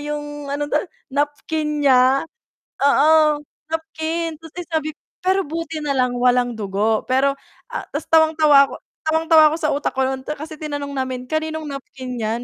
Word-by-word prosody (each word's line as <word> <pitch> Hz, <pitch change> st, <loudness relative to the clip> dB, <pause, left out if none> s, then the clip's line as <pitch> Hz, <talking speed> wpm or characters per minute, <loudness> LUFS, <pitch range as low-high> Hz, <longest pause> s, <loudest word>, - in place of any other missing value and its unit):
'yong 295 Hz, -1 st, -5 dB
ano 285 Hz, +1 st, -1 dB
'to, 300 Hz, -, +3 dB, 0.3 s
napkin 295 Hz, +1 st, -1 dB
niya, 260 Hz, +1 st, +5 dB, 0.6 s
oo, 305 Hz, +2 st, +5 dB, 0.3 s
napkin. 320 Hz, 0 st, -3 dB
Tapos, 325 Hz, -1 st, -14 dB
eh, 355 Hz, -, -4 dB
sabi 310 Hz, -1 st, 0 dB, 0.3 s
pero, 380 Hz, +1 st, +2 dB
buti 320 Hz, 0 st, -5 dB
na 290 Hz, -, -1 dB
lang, 250 Hz, -1 st, +1 dB
walang 245 Hz, -1 st, +2 dB
dugo. 210 Hz, +1 st, 0 dB
Pero, 275 Hz, +2 st, +2 dB, 0.4 s
a -, -, -3 dB
'tas -, -, -4 dB
tawang-tawa 310 Hz, -3 st, +5 dB
ko -, -, -6 dB, 0.3 s
tawang-tawa 320 Hz, -1 st, +5 dB
ako -, -, -1 dB
sa 305 Hz, -2 st, 0 dB
utak 290 Hz, -, -1 dB
ko 265 Hz, -, +2 dB
no'n, 265 Hz, 0 st, -3 dB
kasi 310 Hz, +2 st, -8 dB
tinanong 290 Hz, -2 st, -4 dB
namin, 260 Hz, -1 st, -3 dB
"Kaninong 315 Hz, +1 st, -2 dB
napkin 265 Hz, -2 st, -7 dB
'yan?" 225 Hz, +2 st, -2 dB
295 Hz, 160 wpm, -21 LUFS, 265-315 Hz, 0.6 s, niya